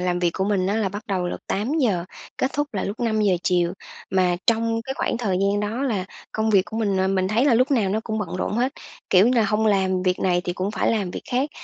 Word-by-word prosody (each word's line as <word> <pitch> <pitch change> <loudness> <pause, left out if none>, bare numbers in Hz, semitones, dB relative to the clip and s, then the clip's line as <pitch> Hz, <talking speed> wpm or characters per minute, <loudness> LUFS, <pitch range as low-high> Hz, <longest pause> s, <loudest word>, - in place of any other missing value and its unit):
làm 180 -1 0
việc 175 -1 +2
của 190 - 0
mình 195 -2 +1
á 205 +3 0
là 215 -3 +1
bắt 205 +3 -7
đầu 185 -3 -1
lúc - - -5
8:00, 215 - 0 0.3
kết 260 - -1
thúc 290 -4 -2
là 195 - -1
lúc 205 +5 -5
5:00 215 -5 +2
chiều, 175 -1 +1 0.4
mà 180 -2 +2
trong 230 0 +2
cái 265 +3 -5
khoảng 240 - -1
thời 200 -6 0
gian 200 +1 +1
đó 220 +5 -2
là 215 -9 -1 0.3
công 220 0 0
việc 195 -3 +5
của 220 - -7
mình, 205 -4 0
ờ, 190 0 +2
mình 190 -1 +1
thấy 225 +5 +2
là 275 -5 +4
lúc 255 +4 +3
nào 225 -8 +2
nó 215 - 0
cũng 220 -1 -2
bận 185 -3 -4
rộn - - -2
hết, 250 +4 0 0.4
kiểu 190 +3 +6
như 250 - +2
là, 225 - +4
hông 215 +1 +1
làm 190 -3 +2
việc 185 -1 +1
này 175 -1 +2
thì 175 - -1
cũng 185 +3 -2
phải - - 0
làm 200 -5 -1
việc - - -6
khác. 260 +4 0
205 Hz, 270 wpm, -23 LUFS, 185-230 Hz, 0.4 s, kiểu